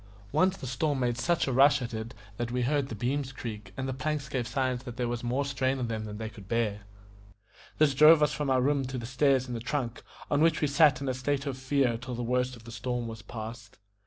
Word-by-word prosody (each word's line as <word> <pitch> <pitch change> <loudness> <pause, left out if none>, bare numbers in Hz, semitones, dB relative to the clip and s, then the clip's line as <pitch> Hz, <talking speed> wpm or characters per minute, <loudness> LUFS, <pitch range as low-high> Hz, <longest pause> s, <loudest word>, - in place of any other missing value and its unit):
Once 190 +1 +3
the - - -7
storm 135 +3 0
made 120 -2 +1
such 170 +8 +1
a - - 0
rush 140 +2 +6
at 120 -2 -5
it 110 +2 -5 0.2
that 120 -1 -2
we 125 +1 -1
heard 140 +1 +1
the 115 - -5
beams 135 +5 -1
creak, 105 -6 -7
and 130 - -2
the 130 - -2
planks 145 +2 -2
gave 130 -4 -2
signs 130 -3 -1
that 120 -2 -8
there 125 -1 0
was 120 0 -3
more 125 +4 0
strain 135 -1 0
on 125 -3 -2
them 110 -1 -3
than 105 -1 -6
they 110 0 -4
could 110 -3 -11
bear. 105 -3 -1 0.9
This 150 -3 +4
drove 150 +2 +7
us 150 - +2
from 140 0 -2
our 130 -1 +3
room 140 0 +2
to 130 0 -4
the 120 - -5
stairs 130 +1 +2
in 125 - -5
the 115 - -3
trunk, 125 0 -3 0.3
on 145 0 +3
which 165 0 +4
we 150 - +2
sat 140 0 +4
in 140 - -3
a 130 - +1
state 135 +2 -1
of 140 -2 -2
fear 130 -3 +1
till 125 0 -6
the 120 - -3
worst 125 +1 0
of 115 - -15
the 115 - -10
storm 120 0 -3
was 110 -2 -7
past. 115 +3 -8
130 Hz, 255 wpm, -29 LUFS, 120-140 Hz, 0.9 s, drove